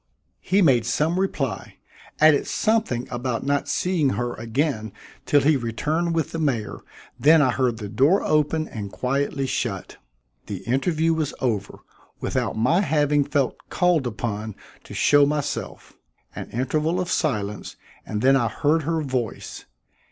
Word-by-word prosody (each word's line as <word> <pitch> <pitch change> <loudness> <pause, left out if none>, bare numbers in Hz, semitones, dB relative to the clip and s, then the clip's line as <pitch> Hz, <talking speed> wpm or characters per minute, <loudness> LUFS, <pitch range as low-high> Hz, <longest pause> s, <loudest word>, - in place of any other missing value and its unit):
He 195 +1 +2
made 125 -7 +3
some 155 +9 +1
reply, 150 -9 -2 0.4
added 155 -1 +5
something 215 - 0
about 125 0 -3
not 145 0 0
seeing 175 -6 +1
her 120 0 -2
again 115 -2 -2 0.4
till 145 - +4
he 150 +2 +4
returned 155 +8 -1
with 160 -4 -1
the 165 - -4
mayor, 125 -9 -1 0.4
then 160 +3 +6
I 130 -4 +3
heard 125 -2 0
the 105 -2 -6
door 135 - +3
open 155 +1 +1
and 100 -3 -7
quietly 135 +3 -1
shut. 130 - -3 0.5
The 100 -3 -6
interview 155 +6 +1
was 155 -3 -2
over, 110 -6 -2 0.4
without - - -2
my 130 - +3
having 150 -3 +2
felt 140 -2 0
called 175 -7 +2
upon 110 -2 -4 0.3
to - - -10
show 145 -1 +5
myself. 145 -1 -4 0.4
An - - -7
interval 155 +8 -1
of 180 -1 -2
silence, 105 - -2 0.3
and 105 +1 -4
then 135 +1 +5
I 120 -4 +2
heard 150 +7 +1
her 160 +1 -1
voice. 130 -5 -4
140 Hz, 145 wpm, -23 LUFS, 120-155 Hz, 0.5 s, then